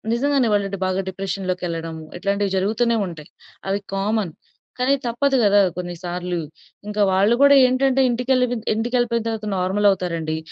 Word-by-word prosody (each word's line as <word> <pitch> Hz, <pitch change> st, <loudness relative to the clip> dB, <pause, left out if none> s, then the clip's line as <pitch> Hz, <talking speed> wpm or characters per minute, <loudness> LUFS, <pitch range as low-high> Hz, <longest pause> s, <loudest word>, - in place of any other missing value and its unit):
నిజంగానే 275 Hz, -1 st, +1 dB
వాళ్ళు 200 Hz, -1 st, -2 dB
బాగా 185 Hz, +1 st, 0 dB
డిప్రెషన్‌లోకి 185 Hz, -1 st, -4 dB
ఎళ్ళడము 165 Hz, -1 st, -5 dB, 0.2 s
ఇట్లాంటివి 200 Hz, +1 st, -1 dB
జరుగుతూనే 230 Hz, +4 st, +1 dB
ఉంటాయి. 165 Hz, -2 st, -10 dB, 0.4 s
అవి 195 Hz, +1 st, 0 dB, 0.2 s
కామన్. 200 Hz, -3 st, -1 dB, 0.5 s
కానీ, 255 Hz, +2 st, +3 dB
తప్పదు 265 Hz, +4 st, +1 dB
కదా 205 Hz, 0 st, +5 dB, 0.2 s
కొన్ని 175 Hz, -1 st, -4 dB
సార్లు. 175 Hz, 0 st, -3 dB, 0.5 s
ఇంకా 210 Hz, 0 st, -2 dB
వాళ్ళు 200 Hz, +5 st, +3 dB
కూడా 280 Hz, 0 st, +7 dB
ఏంటంటే 265 Hz, +1 st, +2 dB
ఇంటికెళ్ళిపొన్ 250 Hz, -1 st, 0 dB
ఇంటికెళ్ళిపోయిన 235 Hz, 0 st, 0 dB
తర్వాత 220 Hz, -2 st, -3 dB
నార్మల్ 190 Hz, +3 st, +1 dB
అవుతారండి. 170 Hz, -4 st, -2 dB
205 Hz, 135 wpm, -21 LUFS, 185-240 Hz, 0.5 s, కూడా